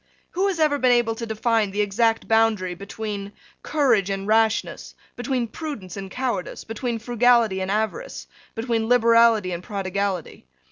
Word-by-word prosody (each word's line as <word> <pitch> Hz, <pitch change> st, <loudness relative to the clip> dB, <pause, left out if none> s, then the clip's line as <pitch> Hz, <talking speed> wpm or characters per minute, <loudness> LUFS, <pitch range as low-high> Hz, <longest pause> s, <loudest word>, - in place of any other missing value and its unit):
Who 380 Hz, +3 st, 0 dB
has 375 Hz, -4 st, -2 dB
ever 300 Hz, -2 st, +2 dB
been 255 Hz, -1 st, +3 dB
able 240 Hz, -2 st, +2 dB
to 230 Hz, +1 st, -6 dB
define 220 Hz, -1 st, +1 dB
the 205 Hz, +2 st, -1 dB
exact 225 Hz, +3 st, +1 dB
boundary 225 Hz, -5 st, +2 dB
between 200 Hz, +1 st, -6 dB, 0.3 s
courage 240 Hz, -10 st, +1 dB
and 195 Hz, 0 st, -3 dB
rashness, 220 Hz, +1 st, 0 dB, 0.2 s
between 245 Hz, -1 st, -2 dB
prudence 220 Hz, -, -7 dB
and 195 Hz, -1 st, -7 dB
cowardice, 240 Hz, -4 st, -3 dB
between 230 Hz, +1 st, -3 dB
frugality 235 Hz, -3 st, +2 dB
and 185 Hz, -, -3 dB
avarice, 220 Hz, -, -3 dB, 0.3 s
between 225 Hz, -1 st, -1 dB
liberality 230 Hz, -4 st, +4 dB
and 170 Hz, 0 st, -4 dB
prodigality? 195 Hz, -, -4 dB
225 Hz, 145 wpm, -23 LUFS, 200-240 Hz, 0.3 s, liberality